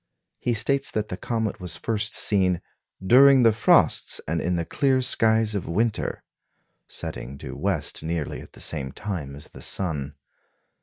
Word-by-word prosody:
He 120 Hz, -, -1 dB
states 135 Hz, +5 st, +4 dB
that 105 Hz, -1 st, -3 dB
the -, -, -3 dB
comet 110 Hz, +1 st, -3 dB
was 90 Hz, -, -1 dB
first 110 Hz, -1 st, -1 dB
seen 95 Hz, -4 st, +2 dB, 0.5 s
"during 135 Hz, +4 st, +7 dB
the 115 Hz, -, +6 dB
frosts 110 Hz, +1 st, +3 dB
and 80 Hz, +2 st, -1 dB
in 90 Hz, +1 st, -1 dB
the 85 Hz, -1 st, -2 dB
clear 135 Hz, -, +1 dB
skies 110 Hz, -3 st, +2 dB
of 100 Hz, -4 st, -3 dB
winter," 110 Hz, +7 st, -1 dB, 0.6 s
setting 65 Hz, +3 st, -7 dB
due -, -, -8 dB
west -, -, -2 dB
nearly 80 Hz, -2 st, -4 dB
at -, -, -15 dB
the -, -, -12 dB
same 65 Hz, -1 st, -3 dB
time 85 Hz, -10 st, -5 dB
as 70 Hz, -, -11 dB
the -, -, -13 dB
sun. 75 Hz, -7 st, -2 dB
105 Hz, 160 wpm, -24 LUFS, 85-115 Hz, 0.6 s, during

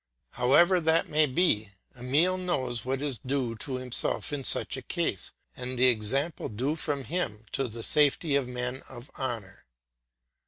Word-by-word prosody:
However 170 Hz, +9 st, +4 dB
that 160 Hz, +1 st, +2 dB
may 155 Hz, 0 st, +3 dB
be, 120 Hz, -, +1 dB, 0.2 s
Emile 145 Hz, +9 st, +1 dB
knows 130 Hz, -11 st, -1 dB
what 135 Hz, +2 st, -3 dB
is 140 Hz, -5 st, -3 dB
due 130 Hz, -3 st, -1 dB
to 130 Hz, +4 st, -5 dB
himself 130 Hz, +3 st, +3 dB
in 140 Hz, -2 st, -3 dB
such -, -, +3 dB
a -, -, -6 dB
case, -, -, -2 dB, 0.2 s
and 125 Hz, 0 st, -5 dB
the 130 Hz, +1 st, +5 dB
example 130 Hz, +8 st, -2 dB
due 130 Hz, +8 st, -2 dB
from 145 Hz, -4 st, -2 dB
him 115 Hz, -, -4 dB
to 135 Hz, -, 0 dB
the 115 Hz, 0 st, -8 dB
safety 150 Hz, +2 st, +2 dB
of 140 Hz, -3 st, +1 dB
men 125 Hz, +1 st, -4 dB
of 120 Hz, 0 st, -12 dB
honour. 115 Hz, -8 st, -5 dB
130 Hz, 160 wpm, -28 LUFS, 120-150 Hz, 0.2 s, the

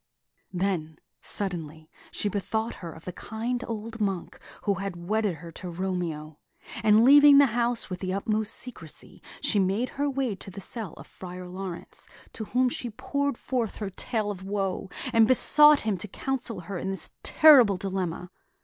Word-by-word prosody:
Then, 175 Hz, -5 st, -2 dB, 0.2 s
suddenly, 160 Hz, -5 st, -4 dB, 0.2 s
she -, -, -2 dB
bethought 220 Hz, +3 st, -2 dB
her 170 Hz, -2 st, -6 dB
of 160 Hz, +1 st, -13 dB
the 180 Hz, -, -4 dB
kind 235 Hz, +6 st, -4 dB
old 225 Hz, 0 st, -5 dB
monk 195 Hz, -4 st, -2 dB, 0.2 s
who 200 Hz, -, +2 dB
had 195 Hz, -1 st, -4 dB
wedded 200 Hz, +2 st, -1 dB
her 165 Hz, +2 st, -10 dB
to 180 Hz, +2 st, -8 dB
Romeo; 170 Hz, -4 st, -4 dB, 0.4 s
and 215 Hz, +1 st, +5 dB
leaving 285 Hz, +1 st, +9 dB
the 285 Hz, -, +8 dB
house 240 Hz, 0 st, 0 dB
with 185 Hz, -2 st, -5 dB
the 185 Hz, -1 st, -3 dB
utmost 210 Hz, +2 st, -1 dB
secrecy, 250 Hz, 0 st, -7 dB, 0.2 s
she 210 Hz, -, +2 dB
made 200 Hz, +6 st, +1 dB
her 285 Hz, +1 st, -1 dB
way 270 Hz, -4 st, -1 dB
to 195 Hz, -, -10 dB
the 195 Hz, +1 st, -9 dB
cell 205 Hz, -1 st, -5 dB
of -, -, -11 dB
Friar 180 Hz, 0 st, -9 dB
Laurence, 185 Hz, -1 st, -7 dB, 0.3 s
to 220 Hz, -, -5 dB
whom 250 Hz, +4 st, +2 dB
she 245 Hz, 0 st, -3 dB
poured 280 Hz, +4 st, -2 dB
forth 240 Hz, -5 st, -2 dB
her 205 Hz, -2 st, -5 dB
tale 215 Hz, +1 st, -2 dB
of 190 Hz, -2 st, -8 dB
woe, 195 Hz, -1 st, -2 dB, 0.2 s
and 225 Hz, -1 st, +6 dB
besought 295 Hz, +4 st, +6 dB
him 210 Hz, -4 st, -1 dB
to 210 Hz, -, -4 dB
counsel 245 Hz, -1 st, -4 dB
her 185 Hz, +1 st, -5 dB
in 190 Hz, -, -3 dB
this 195 Hz, -, -4 dB
terrible 260 Hz, -, +7 dB
dilemma. 180 Hz, -2 st, -3 dB
200 Hz, 170 wpm, -27 LUFS, 180-235 Hz, 0.4 s, leaving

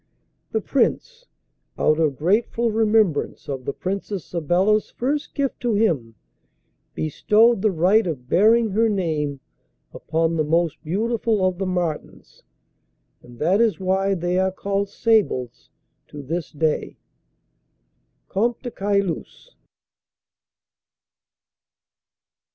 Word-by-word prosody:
The 220 Hz, -, 0 dB
Prince, 475 Hz, -, -1 dB, 0.5 s
out 155 Hz, +1 st, +2 dB
of 155 Hz, -4 st, +1 dB
grateful 225 Hz, +7 st, +1 dB
remembrance 215 Hz, -7 st, +1 dB
of 135 Hz, -3 st, -5 dB
the -, -, -1 dB
Princess 195 Hz, +3 st, -4 dB
Sabella's 180 Hz, +6 st, +1 dB
first 285 Hz, +4 st, -3 dB
gift 280 Hz, -2 st, -2 dB
to 240 Hz, -3 st, 0 dB
him 150 Hz, -, 0 dB, 0.8 s
bestowed 210 Hz, +8 st, +3 dB
the 215 Hz, -, +3 dB
right 190 Hz, +4 st, +3 dB
of 130 Hz, -7 st, -5 dB
bearing 220 Hz, -, +4 dB
her 225 Hz, +3 st, +2 dB
name 155 Hz, -8 st, -2 dB, 0.5 s
upon 165 Hz, +1 st, -1 dB
the 155 Hz, -, +2 dB
most 160 Hz, -1 st, 0 dB
beautiful 215 Hz, +3 st, 0 dB
of 185 Hz, -1 st, -1 dB
the 195 Hz, -, -1 dB
martens, 175 Hz, -4 st, -4 dB, 0.8 s
and 120 Hz, 0 st, -15 dB
that 180 Hz, -, +2 dB
is 225 Hz, -4 st, +2 dB
why 190 Hz, +1 st, +1 dB
they 175 Hz, +1 st, -1 dB
are 190 Hz, 0 st, +1 dB
called 200 Hz, +1 st, -2 dB
sables 205 Hz, -, 0 dB, 0.4 s
to 145 Hz, -1 st, -9 dB
this 165 Hz, +4 st, -4 dB
day. 155 Hz, 0 st, -1 dB, 1.3 s
Comte 235 Hz, +6 st, -1 dB
de 245 Hz, -, -5 dB
Caylus. 200 Hz, -, -2 dB
190 Hz, 110 wpm, -22 LUFS, 160-220 Hz, 1.3 s, bearing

